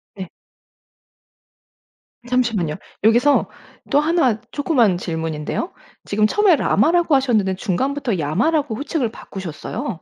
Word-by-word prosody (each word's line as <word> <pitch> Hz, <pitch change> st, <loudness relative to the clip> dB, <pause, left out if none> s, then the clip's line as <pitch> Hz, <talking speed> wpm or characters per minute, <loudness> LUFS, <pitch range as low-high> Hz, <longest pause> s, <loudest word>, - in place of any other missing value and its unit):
네. 190 Hz, -3 st, -7 dB, 2.0 s
잠시만요. 230 Hz, -11 st, 0 dB, 0.3 s
여기서 240 Hz, +6 st, +4 dB, 0.4 s
또 285 Hz, -, +5 dB
1 300 Hz, -8 st, +1 dB
조그만 245 Hz, -, +2 dB
질문인데요. 160 Hz, -, -4 dB, 0.3 s
지금 210 Hz, +1 st, +2 dB
처음에 400 Hz, -, +4 dB
라마라고 325 Hz, -, +2 dB
하셨는데 220 Hz, -8 st, +1 dB
중간부터 255 Hz, +5 st, -1 dB
야마라고 270 Hz, -, 0 dB
호칭을 280 Hz, -1 st, -2 dB
바꾸셨어요. 190 Hz, -, -6 dB
235 Hz, 275 characters per minute, -20 LUFS, 190-290 Hz, 2.0 s, 또